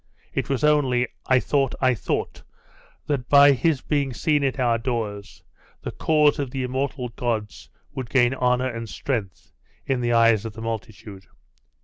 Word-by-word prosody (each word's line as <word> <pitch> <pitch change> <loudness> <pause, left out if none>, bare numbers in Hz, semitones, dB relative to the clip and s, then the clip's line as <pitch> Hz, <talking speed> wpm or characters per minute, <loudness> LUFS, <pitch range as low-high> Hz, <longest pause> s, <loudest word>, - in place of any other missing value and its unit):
It - - -2
was 135 0 -1
only 135 -5 +3 0.2
I 130 -1 +4
thought 135 0 0
I 130 -1 +3
thought 110 - -3 0.6
that 135 -4 -2
by 145 0 +8
his 140 +1 +1
being 140 -3 -1
seen 150 -2 +1
at 135 0 -1
our 120 -2 +2
doors, 110 -5 -4 0.4
the - - -4
cause 150 -1 +2
of 140 -3 -2
the 130 +1 -4
immortal 130 0 -3
gods 115 -3 -4 0.2
would 130 -3 -6
gain 125 -2 +3
honour 125 0 +1
and 115 -3 -6
strength 110 -9 -4 0.3
in 130 -2 -1
the 120 0 0
eyes 115 -2 +4
of 115 -2 -6
the 110 - -9
multitude.... 110 -3 -7
125 Hz, 160 wpm, -23 LUFS, 115-140 Hz, 0.6 s, by